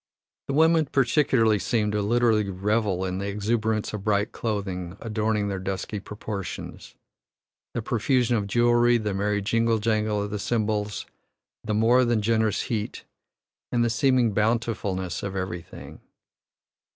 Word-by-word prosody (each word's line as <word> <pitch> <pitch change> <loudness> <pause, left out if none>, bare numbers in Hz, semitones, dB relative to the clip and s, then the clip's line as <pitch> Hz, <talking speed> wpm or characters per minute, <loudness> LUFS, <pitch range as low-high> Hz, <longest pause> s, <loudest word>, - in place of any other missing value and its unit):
The 140 - -2
women 160 0 +4
particularly 125 -5 +3
seem 105 -2 0
to 105 0 0
literally 110 -1 +2
revel 100 0 0
in 95 0 -3
the 100 - -3
exuberance 110 +1 -1
of 105 -2 -5
bright 105 0 +1
coloring 95 -5 -4
adorning 110 -2 -1
their 100 -1 -3
dusky 95 +2 -4
proportions, 100 -2 -7 0.8
the 115 - -2
profusion 120 +2 +1
of 105 -3 -1
jewellery, 120 +2 +4
the 105 -3 -2
merry 100 +1 0
jingle 115 +2 +2
jangle 105 -1 0
of 105 - -5
the 105 - -3
cymbals, 105 -2 -1 0.6
the 105 -1 -1
more 120 +4 +4
than 120 -3 +1
generous 110 -1 +1
heat, 110 -4 -4 0.7
and 120 -1 +2
the 115 - +1
seeming 125 -2 +2
bountifulness 105 -5 -1
of 100 -2 -4
everything. 90 -2 -6
110 Hz, 140 wpm, -25 LUFS, 100-115 Hz, 0.8 s, women